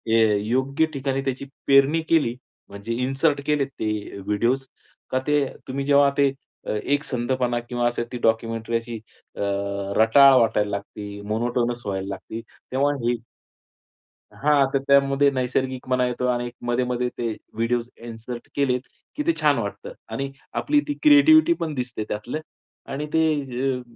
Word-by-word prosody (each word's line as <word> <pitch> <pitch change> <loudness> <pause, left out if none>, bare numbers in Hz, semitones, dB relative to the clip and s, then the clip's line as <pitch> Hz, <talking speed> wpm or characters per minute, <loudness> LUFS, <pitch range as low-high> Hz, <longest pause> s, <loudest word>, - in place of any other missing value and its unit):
ए 110 -2 +4
योग्य 130 +6 +1
ठिकाणी 135 0 -1
त्याची 135 0 -2 0.2
पेरणी 140 +4 +5
केली, 145 -8 +3 0.3
म्हणजे 100 +3 -5
इन्सर्ट 140 +2 +1
केले 150 -2 +2
ते 110 -5 -4 0.3
व्हिडिओज, 120 +7 0 0.4
का 130 - +1
ते, 145 -1 +3 0.2
तुम्ही 135 +1 -3
जेव्हा 140 0 +5
ते 140 -1 +4 0.6
एकसंधपणा 125 -3 -1
किंवा 120 0 -1
असे 120 +1 -4
डॉक्युमेंटरी 115 0 0
अशी 115 0 -6 0.4
अ, - - -6 0.6
रटाळ 135 +5 +7
वाटायला 105 -2 +2
लागती, 100 0 -6
मोनोटोनस 120 +2 -1
व्हायला 95 -1 -3
लागती. 110 +3 -6 0.3
तेव्हा 140 +2 +2
हे 120 0 +2 1.2
हां, 145 -1 +4
तर 135 - +3
त्यामध्ये 140 0 +4
नैसर्गिकपणा 130 0 -1
येतो 125 0 -2
आणि 120 0 0
एक 120 - -9
मध्ये-मध्ये 125 0 0
ते 120 - -1 0.3
व्हिडिओज 115 +1 -1
इन्सर्ट 120 +1 -8
केले 135 -3 +2 0.4
की 300 - -2
ते 335 - +4
छान - - +4
वाटतं 485 +2 -5 0.2
आणि 135 0 -3 0.3
आपली 295 0 +2
ती 290 - 0
क्रिएटिव्हिटी 315 +2 +7
पण 160 -2 -2
दिसते 125 -4 -3
त्यातलं 120 +8 -3 0.5
आणि 145 +2 -3
ते 160 0 +4 0.6
अ, - - -8
125 Hz, 140 wpm, -24 LUFS, 115-140 Hz, 1.2 s, रटाळ